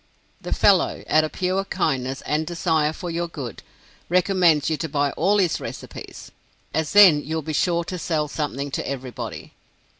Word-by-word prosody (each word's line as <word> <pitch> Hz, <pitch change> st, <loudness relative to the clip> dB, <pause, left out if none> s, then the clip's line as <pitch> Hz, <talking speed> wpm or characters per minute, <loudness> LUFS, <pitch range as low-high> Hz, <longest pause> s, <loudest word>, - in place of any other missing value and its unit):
The -, -, -7 dB
fellow, -, -, +3 dB
out 155 Hz, -, +4 dB
of 155 Hz, -, -3 dB
pure 185 Hz, +1 st, -1 dB
kindness 135 Hz, -9 st, -2 dB
and 155 Hz, +1 st, -1 dB
desire 160 Hz, -3 st, +1 dB
for 175 Hz, +2 st, -6 dB
your 170 Hz, +1 st, -2 dB
good, 135 Hz, -9 st, -7 dB, 0.5 s
recommends 180 Hz, -4 st, +3 dB
you 160 Hz, -, +1 dB
to 160 Hz, +3 st, -4 dB
buy 145 Hz, 0 st, 0 dB
all 195 Hz, +5 st, +2 dB
his 185 Hz, -5 st, +1 dB
recipes, -, -, -9 dB, 0.4 s
as 160 Hz, -1 st, -1 dB
then 185 Hz, -8 st, +7 dB
you 160 Hz, +2 st, -4 dB
will 160 Hz, -, -2 dB
be 155 Hz, +1 st, -4 dB
sure 170 Hz, +2 st, +1 dB
to 180 Hz, +1 st, -6 dB
sell 155 Hz, -3 st, -1 dB
something 145 Hz, -2 st, -4 dB
to -, -, -3 dB
everybody. 130 Hz, -2 st, -6 dB
160 Hz, 175 wpm, -23 LUFS, 145-175 Hz, 0.5 s, then